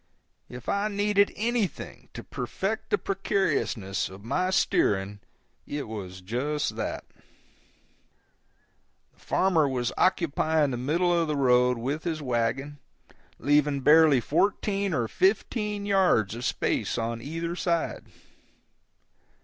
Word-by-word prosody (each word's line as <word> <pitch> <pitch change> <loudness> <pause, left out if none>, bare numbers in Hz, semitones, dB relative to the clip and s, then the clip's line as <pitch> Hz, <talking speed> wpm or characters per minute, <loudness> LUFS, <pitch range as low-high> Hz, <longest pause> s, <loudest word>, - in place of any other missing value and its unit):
If 125 -1 -10
I 200 +1 0
needed 205 -1 +2
anything 230 -2 -3
to - - -7
perfect - - -4
the 425 - +2
precariousness 155 - -1
of 95 +1 -12
my 180 +11 0
steering, 100 - +1 0.5
it 145 -3 -4
was 95 -4 -7
just 130 +10 -2
that. - - -4 2.1
The - - -31
farmer 165 -6 +2
was 125 -2 -2
occupying 160 -4 +2
the - - -2
middle 170 +8 +1
of 170 -1 +1
the 150 - -1
road 125 -2 +3
with 140 +7 -3
his 165 -3 -2
wagon, 135 +2 -2 0.6
leaving 145 -1 +2
barely 150 -1 +6
fourteen 200 - 0
or 120 -8 0
fifteen 205 - 0
yards 185 - +2
of 120 +2 -5
space - - -1
on 115 0 -3
either 165 +5 -4
side. 170 -2 -1
150 Hz, 115 wpm, -27 LUFS, 125-185 Hz, 2.1 s, barely